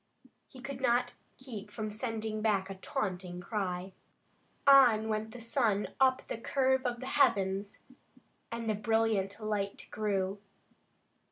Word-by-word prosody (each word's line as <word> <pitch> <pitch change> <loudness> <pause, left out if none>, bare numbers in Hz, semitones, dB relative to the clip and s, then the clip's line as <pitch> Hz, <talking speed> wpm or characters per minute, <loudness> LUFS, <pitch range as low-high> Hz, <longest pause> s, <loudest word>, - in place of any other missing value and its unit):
He 260 - -14
could 265 0 -6
not 240 -1 +2 0.3
keep 220 -6 -8
from 215 0 -4
sending 220 -1 -3
back 200 -3 +1
a - - -3
taunting 185 -2 -4
cry. 185 -1 -3 0.7
On 245 -6 +7
went 215 0 -1
the 245 - -10
sun 230 -4 +1
up 260 -1 +4
the - - -4
curve 265 +1 +1
of 240 0 -3
the - - -5
heavens, 200 -8 +1 0.7
and 230 0 -4
the 215 - +2
brilliant 215 -2 +1
light 210 -2 -3
grew. 200 -2 -1
215 Hz, 135 wpm, -32 LUFS, 200-245 Hz, 0.7 s, On